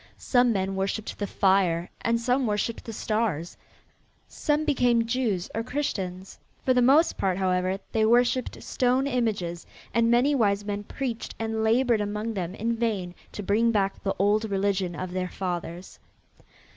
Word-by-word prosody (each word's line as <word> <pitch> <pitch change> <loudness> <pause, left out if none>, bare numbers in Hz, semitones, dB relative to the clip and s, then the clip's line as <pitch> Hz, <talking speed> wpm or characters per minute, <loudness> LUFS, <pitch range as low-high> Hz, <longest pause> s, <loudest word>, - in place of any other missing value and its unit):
Some 245 -2 +3
men 195 -2 -1
worshipped 195 +3 -3
the 205 - -1
fire 185 -3 +2
and 230 0 +1
some 250 +2 +1
worshipped 210 +2 -2
the 225 - -5
stars. 215 -7 -2 0.7
Some 300 0 0
became 245 -6 +3
Jews 230 -7 -1
or 225 - -1
Christians. 195 -8 -4 0.3
For 255 - +4
the 250 - +3
most 280 +7 +4
part, 185 -2 +1
however, 185 0 +1
they 220 - +2
worshipped 245 +2 +2
stone 255 +1 +1
images 215 -10 -1 0.3
and 230 +1 +3
many 245 +5 +4
wise 205 -6 +1
men 205 0 -3
preached 245 -2 -4
and 225 0 -2
labored 230 0 +3
among 210 +2 -3
them 185 -2 -4
in 230 +2 -1
vain 210 -6 -2 0.2
to 205 - -5
bring 215 +4 +2
back 200 -3 0
the 195 - -1
old 210 +3 +2
religion 195 -3 0
of 185 0 -5
their 185 0 -2
fathers. 175 -1 -5
215 Hz, 160 wpm, -26 LUFS, 190-235 Hz, 0.7 s, For